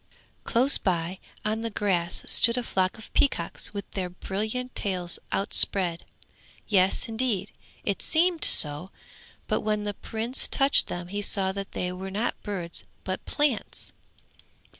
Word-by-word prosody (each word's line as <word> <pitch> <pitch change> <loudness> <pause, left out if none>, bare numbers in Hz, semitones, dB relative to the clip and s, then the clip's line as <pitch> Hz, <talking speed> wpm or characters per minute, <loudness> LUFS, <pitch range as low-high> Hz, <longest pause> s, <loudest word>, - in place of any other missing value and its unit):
Close 255 +4 +3
by 180 0 -1 0.3
on 215 +1 -1
the 230 - -2
grass 185 -5 0
stood 235 +1 +5
a 250 - -1
flock 190 -3 0
of 220 - -13
peacocks 170 -12 +1
with 200 -1 -6
their 185 -2 -3
brilliant 215 +7 -4
tails 180 -3 -1
outspread. 185 -3 +3 0.6
Yes, 190 -3 +3
indeed, 220 -4 -1 0.3
it 200 - -2
seemed 335 +1 +2
so, 150 +4 +4 0.6
but - - 0
when 210 -1 -1
the 205 0 -3
Prince 230 +5 -2
touched 275 +1 +4
them 175 0 -6
he 205 +2 -3
saw 195 -1 +1
that 195 0 -6
they 180 0 -2
were 190 +1 -6
not 210 +5 -1
birds 180 -5 -4 0.2
but 185 0 -4
plants. 290 -6 -1
200 Hz, 140 wpm, -26 LUFS, 185-225 Hz, 0.6 s, stood